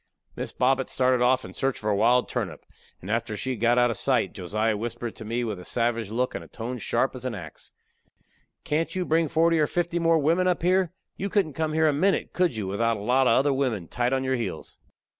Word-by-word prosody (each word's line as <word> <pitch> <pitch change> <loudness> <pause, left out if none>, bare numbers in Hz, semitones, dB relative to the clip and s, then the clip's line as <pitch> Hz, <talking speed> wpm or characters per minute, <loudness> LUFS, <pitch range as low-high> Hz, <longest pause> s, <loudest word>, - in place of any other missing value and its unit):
Miss - - -5
Bobbet 130 +1 +1
started 130 -1 +2
off 125 +1 +3
in 95 - -10
search 135 +4 -1
of - - -12
her 105 0 +1
wild 120 +5 +3
turnip, 95 - -4 0.4
and 95 - -6
after 115 -2 -1
she 130 - -3
had 125 - -4
got 120 +2 +3
out 120 -1 +4
of 110 - -4
sight - - +1
Josiah 110 +4 -1
whispered 120 +1 -5
to 110 - -9
me 115 +3 -1
with 105 -5 -3
a - - -9
savage 115 0 -1
look 125 +3 -1
and - - -5
a - - -13
tone 120 +2 -6
sharp 120 +4 0
as 130 - -8
a 130 - -1
sharp 115 - -6
ax: 80 -3 -11 0.9
"Can't 160 +4 -1
you 185 -1 -1
bring 160 0 +2
forty 165 +2 +3
or 150 - +3
fifty 175 +1 -1
more 165 -1 +3
wimmen 165 +5 +2
up 180 -2 0
here? 185 -1 +2 0.3
You 200 - -3
couldn't 185 -7 +1
come 155 +1 -2
here 160 0 +3
a 150 - +3
minute, 190 +7 +1
could 180 -7 +1
you, 105 -3 -3
without 115 +4 0
a - - -7
lot 125 +4 +3
of - - +5
other 140 +1 +3
wimmen 125 -10 -1
tight 120 0 0
to 135 +1 +1
your 130 0 0
heels?" 115 - -6
125 Hz, 245 wpm, -26 LUFS, 115-155 Hz, 0.9 s, of